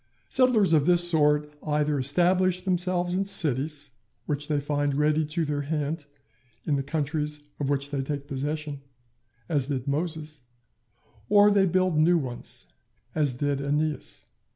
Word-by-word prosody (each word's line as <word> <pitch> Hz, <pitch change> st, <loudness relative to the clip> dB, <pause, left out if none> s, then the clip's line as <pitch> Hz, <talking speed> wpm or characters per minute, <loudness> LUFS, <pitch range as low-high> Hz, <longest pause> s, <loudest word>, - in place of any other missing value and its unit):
Settlers 230 Hz, -9 st, +4 dB
of 150 Hz, -2 st, +3 dB
this 175 Hz, -1 st, +4 dB
sort 150 Hz, -2 st, +2 dB
either 150 Hz, -1 st, 0 dB
establish 180 Hz, +6 st, +2 dB
themselves 180 Hz, -1 st, 0 dB
in 190 Hz, +2 st, +1 dB
cities 150 Hz, -6 st, -1 dB, 0.3 s
which 145 Hz, -1 st, -2 dB
they 150 Hz, -2 st, +1 dB
find 145 Hz, -1 st, -1 dB
ready 150 Hz, +1 st, +2 dB
to 155 Hz, +2 st, -2 dB
their 145 Hz, -1 st, -2 dB
hand 150 Hz, +1 st, -3 dB, 0.6 s
in 150 Hz, -, +1 dB
the 140 Hz, -, 0 dB
countries 150 Hz, +1 st, -2 dB, 0.2 s
of 140 Hz, -2 st, -1 dB
which 140 Hz, 0 st, -1 dB
they 140 Hz, -2 st, -1 dB
take 140 Hz, +1 st, -4 dB
possession, 145 Hz, +1 st, -3 dB, 0.7 s
as 145 Hz, -6 st, 0 dB
did 135 Hz, -3 st, -3 dB
Moses; 155 Hz, 0 st, -3 dB, 0.9 s
or 205 Hz, 0 st, +6 dB
they 195 Hz, -1 st, +4 dB
build 185 Hz, -2 st, +2 dB
new 170 Hz, +3 st, +5 dB
ones, 130 Hz, -6 st, -4 dB, 0.5 s
as 145 Hz, -5 st, +1 dB
did 145 Hz, +1 st, -1 dB
Æneas. 150 Hz, +2 st, -2 dB
150 Hz, 145 wpm, -26 LUFS, 145-175 Hz, 0.9 s, or